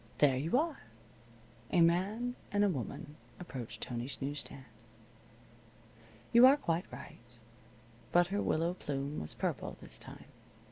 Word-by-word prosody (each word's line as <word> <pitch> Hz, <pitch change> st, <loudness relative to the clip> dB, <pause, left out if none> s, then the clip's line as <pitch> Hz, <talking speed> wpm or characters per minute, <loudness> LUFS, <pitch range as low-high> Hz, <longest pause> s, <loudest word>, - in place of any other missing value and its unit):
There 140 Hz, -3 st, +5 dB
you 160 Hz, -, +1 dB
are. 310 Hz, 0 st, 0 dB, 0.9 s
A 180 Hz, -, +4 dB
man 195 Hz, +9 st, +3 dB, 0.2 s
and 205 Hz, 0 st, +3 dB
a 205 Hz, -, +4 dB
woman 145 Hz, 0 st, -5 dB, 0.2 s
approached 130 Hz, -10 st, -7 dB
Tony's 120 Hz, +2 st, -4 dB
news 145 Hz, +2 st, -2 dB
stand. 135 Hz, -1 st, -6 dB, 1.7 s
You 240 Hz, +2 st, +10 dB
are 275 Hz, +2 st, +7 dB
quite 170 Hz, -, -1 dB
right. -, -, -9 dB, 0.9 s
But 175 Hz, 0 st, +6 dB
her 205 Hz, -, +1 dB
willow 165 Hz, +2 st, +1 dB
plume 145 Hz, -4 st, -3 dB
was 75 Hz, -, -4 dB
purple -, -, -2 dB
this -, -, -9 dB
time. -, -, -10 dB
165 Hz, 135 wpm, -33 LUFS, 140-205 Hz, 1.7 s, You